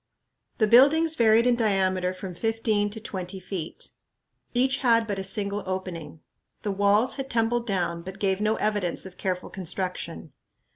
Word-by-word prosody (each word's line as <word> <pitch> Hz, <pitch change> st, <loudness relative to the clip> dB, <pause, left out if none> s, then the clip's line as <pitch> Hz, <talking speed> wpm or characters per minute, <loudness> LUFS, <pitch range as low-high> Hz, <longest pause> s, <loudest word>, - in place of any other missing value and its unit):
The 220 Hz, -, +3 dB
buildings 285 Hz, +8 st, +6 dB
varied 230 Hz, -3 st, +4 dB
in 245 Hz, -1 st, +4 dB
diameter 190 Hz, -5 st, +1 dB
from 185 Hz, 0 st, -7 dB
fifteen 220 Hz, +1 st, 0 dB
to 215 Hz, +2 st, -7 dB
twenty 190 Hz, -3 st, -6 dB
feet. 185 Hz, -3 st, -6 dB, 0.6 s
Each 260 Hz, +2 st, +2 dB
had 230 Hz, -3 st, +3 dB
but 200 Hz, -3 st, -3 dB
a -, -, -3 dB
single 200 Hz, +1 st, -1 dB
opening. 175 Hz, -5 st, -5 dB, 0.4 s
The 205 Hz, -, -1 dB
walls 205 Hz, +6 st, +2 dB
had 270 Hz, -1 st, -4 dB
tumbled 235 Hz, 0 st, 0 dB
down, 175 Hz, -4 st, -1 dB
but 190 Hz, +2 st, -8 dB
gave 195 Hz, -1 st, 0 dB
no 215 Hz, +1 st, +2 dB
evidence 205 Hz, -5 st, -1 dB
of 190 Hz, -1 st, -11 dB
careful 180 Hz, -1 st, -3 dB
construction. 180 Hz, -3 st, -5 dB
200 Hz, 155 wpm, -26 LUFS, 185-225 Hz, 0.6 s, buildings